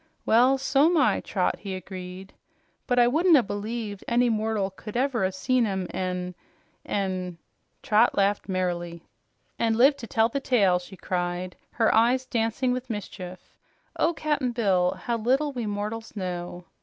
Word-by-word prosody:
"Well, 250 Hz, +4 st, +5 dB
so'm 290 Hz, +5 st, +3 dB
I, 265 Hz, -, +3 dB
Trot," 185 Hz, -3 st, -1 dB
he 195 Hz, -2 st, -5 dB
agreed. 185 Hz, 0 st, -8 dB, 0.5 s
"But 245 Hz, -, +1 dB
I 240 Hz, -1 st, +6 dB
wouldn't 320 Hz, +5 st, +5 dB
'a' 255 Hz, -, +3 dB
believed 205 Hz, 0 st, -5 dB
any 240 Hz, +1 st, +3 dB
mortal 215 Hz, -3 st, 0 dB
could 210 Hz, +4 st, -7 dB
ever 255 Hz, -4 st, +1 dB
'a' 190 Hz, -, +1 dB
seen 235 Hz, +5 st, +1 dB
'em 190 Hz, -2 st, -2 dB
an' 180 Hz, -1 st, -3 dB, 0.5 s
an' 185 Hz, -3 st, -3 dB, 0.2 s
" -, -, -47 dB
Trot 220 Hz, +3 st, +3 dB
laughed 200 Hz, +1 st, +1 dB
merrily. 175 Hz, -2 st, -2 dB, 0.6 s
"An' 225 Hz, -1 st, +2 dB
lived 275 Hz, +4 st, +5 dB
to 230 Hz, -, -7 dB
tell 225 Hz, 0 st, +3 dB
the 260 Hz, +4 st, -3 dB
tale!" 200 Hz, -10 st, +3 dB
she 185 Hz, +2 st, -12 dB
cried, 180 Hz, 0 st, -3 dB, 0.2 s
her 225 Hz, -2 st, +2 dB
eyes 245 Hz, +3 st, +3 dB
dancing 240 Hz, +1 st, 0 dB
with 255 Hz, +1 st, -3 dB
mischief. 185 Hz, -4 st, -7 dB, 0.4 s
"Oh, 335 Hz, +1 st, +1 dB
Cap'n 295 Hz, -6 st, -1 dB
Bill, 190 Hz, -6 st, +2 dB
how 235 Hz, -1 st, -1 dB
little 265 Hz, +6 st, +1 dB
we 240 Hz, -4 st, -3 dB
mortals 210 Hz, +3 st, -4 dB
know!" 180 Hz, -2 st, -5 dB
215 Hz, 160 wpm, -26 LUFS, 185-245 Hz, 0.6 s, I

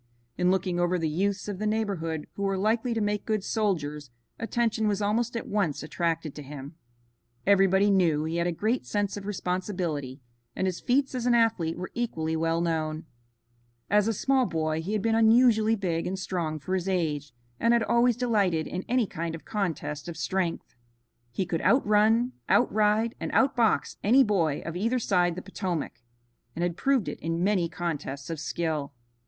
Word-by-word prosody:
In 180 Hz, -, +2 dB
looking 185 Hz, -1 st, 0 dB
over 175 Hz, +1 st, +2 dB
the 165 Hz, -2 st, -1 dB
youths 195 Hz, +6 st, -1 dB
of 200 Hz, -2 st, -4 dB
the 215 Hz, -, -1 dB
neighborhood 190 Hz, -8 st, -2 dB
who -, -, -7 dB
were 195 Hz, -1 st, 0 dB
likely 225 Hz, +4 st, +1 dB
to -, -, 0 dB
make 205 Hz, 0 st, 0 dB
good 215 Hz, -3 st, -1 dB
soldiers, 150 Hz, -, -1 dB, 0.3 s
attention 225 Hz, -1 st, 0 dB
was 205 Hz, -1 st, +1 dB
almost 230 Hz, +3 st, 0 dB
at -, -, -5 dB
once 195 Hz, -10 st, -1 dB
attracted 165 Hz, -1 st, -2 dB
to 150 Hz, -, -8 dB
him. 140 Hz, +1 st, -9 dB, 0.7 s
Everybody 195 Hz, 0 st, +4 dB
knew 165 Hz, -6 st, +3 dB
he 160 Hz, +2 st, -2 dB
had 170 Hz, 0 st, +1 dB
a -, -, +1 dB
great 220 Hz, +9 st, -1 dB
sense 205 Hz, -1 st, -1 dB
of 205 Hz, -1 st, -7 dB
responsibility, 180 Hz, -8 st, -3 dB, 0.4 s
and 190 Hz, -, -1 dB
his 185 Hz, -2 st, -1 dB
feats 270 Hz, +2 st, +1 dB
as 250 Hz, -1 st, -2 dB
an 240 Hz, -, +4 dB
athlete 220 Hz, -9 st, +2 dB
were 185 Hz, -, -6 dB
equally 160 Hz, -10 st, -2 dB
well 165 Hz, +1 st, 0 dB
known. 160 Hz, -2 st, -1 dB, 0.9 s
As 210 Hz, 0 st, +4 dB
a 225 Hz, -, +1 dB
small 265 Hz, +3 st, +2 dB
boy 155 Hz, -1 st, -1 dB
he 190 Hz, +6 st, -4 dB
had 215 Hz, -, -1 dB
been 225 Hz, 0 st, +2 dB
unusually 225 Hz, -1 st, +5 dB
big 175 Hz, -5 st, -2 dB
and 190 Hz, +1 st, -2 dB
strong 175 Hz, -4 st, -2 dB
for 155 Hz, +5 st, -5 dB
his 190 Hz, 0 st, -1 dB
age, 150 Hz, -6 st, -1 dB, 0.3 s
and 230 Hz, -, +3 dB
had 235 Hz, -1 st, +4 dB
always 235 Hz, +1 st, +3 dB
delighted 205 Hz, -10 st, +1 dB
in 185 Hz, +1 st, -4 dB
any 250 Hz, -1 st, +3 dB
kind 165 Hz, -3 st, -4 dB
of 165 Hz, -, -11 dB
contest 155 Hz, -8 st, -3 dB
of 170 Hz, -2 st, -6 dB
strength. 180 Hz, 0 st, -2 dB, 0.6 s
He 155 Hz, +11 st, -2 dB
could 170 Hz, -2 st, -2 dB
outrun, 225 Hz, +1 st, +3 dB, 0.2 s
outride 215 Hz, 0 st, +3 dB
and -, -, -4 dB
outbox 240 Hz, -5 st, +2 dB
any 255 Hz, +7 st, +6 dB
boy 170 Hz, -, 0 dB
of 165 Hz, -, -5 dB
either 230 Hz, +7 st, 0 dB
side 180 Hz, -7 st, +1 dB
the 185 Hz, -, -6 dB
Potomac, 180 Hz, -10 st, -4 dB, 0.5 s
and 170 Hz, -, -2 dB
had 175 Hz, -1 st, -1 dB
proved 270 Hz, +1 st, +1 dB
it -, -, -5 dB
in 165 Hz, +2 st, -2 dB
many 185 Hz, -4 st, +2 dB
contests 155 Hz, -4 st, -4 dB
of 165 Hz, -, -4 dB
skill. 150 Hz, -2 st, -2 dB
190 Hz, 180 wpm, -27 LUFS, 165-220 Hz, 0.9 s, any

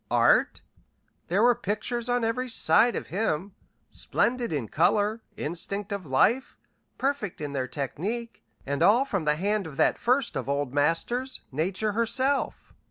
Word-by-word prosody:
Art? -, -, +3 dB, 0.7 s
There 195 Hz, +6 st, +2 dB
were 245 Hz, 0 st, +6 dB
pictures 235 Hz, +1 st, -3 dB
on 245 Hz, -1 st, +1 dB
every 250 Hz, +3 st, -1 dB
side 230 Hz, 0 st, +4 dB
of -, -, -5 dB
him, 190 Hz, -1 st, -1 dB, 0.4 s
splendid 240 Hz, -3 st, 0 dB
in 140 Hz, -8 st, -2 dB
color, 210 Hz, -, +1 dB, 0.2 s
instinct 195 Hz, +6 st, -4 dB
of 200 Hz, -5 st, -4 dB
life, 225 Hz, -, +2 dB, 0.4 s
perfect 270 Hz, -8 st, -2 dB
in 145 Hz, -2 st, -5 dB
their 130 Hz, -2 st, -2 dB
technique, 195 Hz, -, -4 dB, 0.2 s
and 140 Hz, 0 st, -2 dB
all 240 Hz, +6 st, +5 dB
from 195 Hz, -, -2 dB
the 150 Hz, 0 st, +3 dB
hand 200 Hz, +2 st, -1 dB
of 145 Hz, -3 st, -10 dB
that -, -, +2 dB
first 250 Hz, +1 st, +1 dB
of 130 Hz, 0 st, -3 dB
Old 140 Hz, -2 st, -1 dB
Masters, 200 Hz, -, 0 dB
Nature 185 Hz, +9 st, -1 dB
herself. 260 Hz, +6 st, 0 dB
205 Hz, 150 wpm, -27 LUFS, 155-240 Hz, 0.7 s, were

